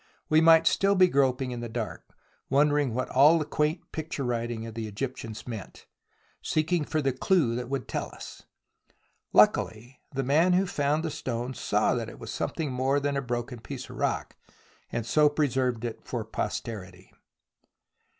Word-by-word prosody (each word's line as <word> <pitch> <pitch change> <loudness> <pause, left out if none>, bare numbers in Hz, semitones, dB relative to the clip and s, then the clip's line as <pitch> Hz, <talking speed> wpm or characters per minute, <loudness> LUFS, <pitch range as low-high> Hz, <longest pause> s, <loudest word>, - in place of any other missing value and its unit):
We 155 +1 +5
might 165 0 +7
still 195 +4 +3
be 185 -1 +6
groping 135 -4 +1
in 120 - -4
the 120 0 -5
dark, 110 -1 -4 0.5
wondering 145 -2 +2
what 130 - -1
all 145 +5 +6
the 155 - -1
quaint 150 +2 -1
picture 155 -3 -4
writing 120 -2 -2
of 115 - -7
the 115 -1 -4
Egyptians 115 0 -6
meant, 110 -5 -8 0.6
seeking 155 0 0
for 155 0 -1
the 135 -1 +1
clue 135 -2 +2
that 125 0 -4
would 135 -2 -3
tell - - -3
us. - - -10 0.9
Luckily 120 +4 +2
the 135 0 -2
man 160 +7 +3
who 185 +2 +3
found 150 -2 0
the 160 - -2
stone 125 -1 -4
saw - - +1
that - - -3
it - - -11
was - - -7
something 155 -4 -2
more 130 +3 +1
than 145 0 -1
a 140 - 0
broken 120 -1 -4
piece 130 +2 -8
of - - -10
rock, - - -1 0.6
and 115 -1 -2
so 150 +4 +4
preserved 130 -5 0
it 115 - -6
for 115 -3 -4
pos 110 - -2
terity. 95 -5 -9
135 Hz, 175 wpm, -27 LUFS, 120-150 Hz, 0.9 s, might